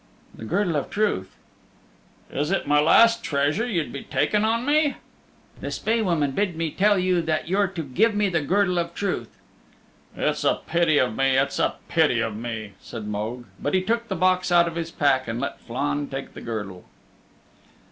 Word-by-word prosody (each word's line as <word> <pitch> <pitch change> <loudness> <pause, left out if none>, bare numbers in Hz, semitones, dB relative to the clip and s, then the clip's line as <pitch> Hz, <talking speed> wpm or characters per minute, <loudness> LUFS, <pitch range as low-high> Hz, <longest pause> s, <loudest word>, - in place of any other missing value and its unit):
"The 110 - -9
Girdle 180 - 0
of 140 - -3
Truth." 200 - -1 1.0
"Is 145 +3 -1
it 195 - 0
my 145 0 +3
last 230 +9 +5
treasure 145 +11 0
you'd 175 -10 -2
be 140 - -5
taking 210 0 0
on 230 +2 +1
me?" 295 0 +2 0.6
"The - - -5
Spae 225 +1 0
Woman 165 -8 +1
bid 190 +4 -1
me 165 -1 -2
tell 205 +4 +3
you 180 -1 +2
that 160 -1 -1
you're 195 +3 +2
to 175 -3 -5
give 205 - +1
me 205 0 +2
the 170 -4 0
Girdle 180 +3 +1
of 170 0 -3
Truth." 180 - -3 0.8
"It's - - 0
a - - +1
pity 170 -3 +2
of 125 -5 +1
me, 135 -1 +2
it's 135 +1 0
a - - +1
pity 155 -8 +2
of 110 -2 -2
me," 110 -2 -5
said 115 -3 -8
Mogue. 110 +4 -4 0.2
But 145 - 0
he 185 - +2
took 230 +3 -1
the - - -2
box 185 +1 +2
out 170 -1 +5
of 170 - -4
his 165 0 -4
pack, 140 -5 +1
and 115 +1 -3
let - - -4
Flann 145 +4 -2
take 135 0 -6
the - - -9
girdle. 105 -6 -6
165 Hz, 190 wpm, -24 LUFS, 135-195 Hz, 1.0 s, last